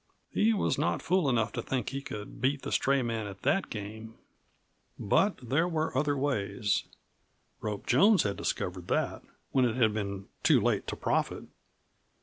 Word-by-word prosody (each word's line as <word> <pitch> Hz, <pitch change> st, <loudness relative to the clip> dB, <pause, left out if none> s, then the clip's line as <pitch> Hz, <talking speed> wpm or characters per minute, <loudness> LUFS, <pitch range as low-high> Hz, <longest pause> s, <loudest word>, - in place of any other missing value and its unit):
He 220 Hz, -, +3 dB
was 210 Hz, -, +1 dB
not -, -, +1 dB
fool 180 Hz, -5 st, +2 dB
enough 115 Hz, -3 st, +1 dB
to 120 Hz, -, -3 dB
think 125 Hz, -1 st, -2 dB
that -, -, -4 dB
he 135 Hz, 0 st, -3 dB
could 105 Hz, -5 st, -8 dB
beat 135 Hz, +2 st, +1 dB
the -, -, -4 dB
stray 140 Hz, -1 st, +2 dB
man 115 Hz, -3 st, -2 dB
at 95 Hz, -1 st, -10 dB
that 195 Hz, -, +1 dB
game. 110 Hz, +2 st, -7 dB, 0.8 s
But 195 Hz, -, +2 dB
there 160 Hz, +8 st, +2 dB
were 160 Hz, -4 st, -1 dB
other 145 Hz, +1 st, +1 dB
ways. 110 Hz, -6 st, 0 dB, 0.7 s
Rope 105 Hz, -2 st, -4 dB
Jones 195 Hz, -, +5 dB
had 100 Hz, -1 st, -1 dB
discovered 90 Hz, -1 st, -3 dB
that -, -, 0 dB, 0.3 s
when 130 Hz, -, +3 dB
it 120 Hz, -2 st, +1 dB
had 110 Hz, -4 st, +3 dB
been 100 Hz, -2 st, -3 dB, 0.2 s
too -, -, +5 dB
late -, -, 0 dB
to -, -, -3 dB
profit. -, -, -1 dB
120 Hz, 170 wpm, -30 LUFS, 105-145 Hz, 0.8 s, Jones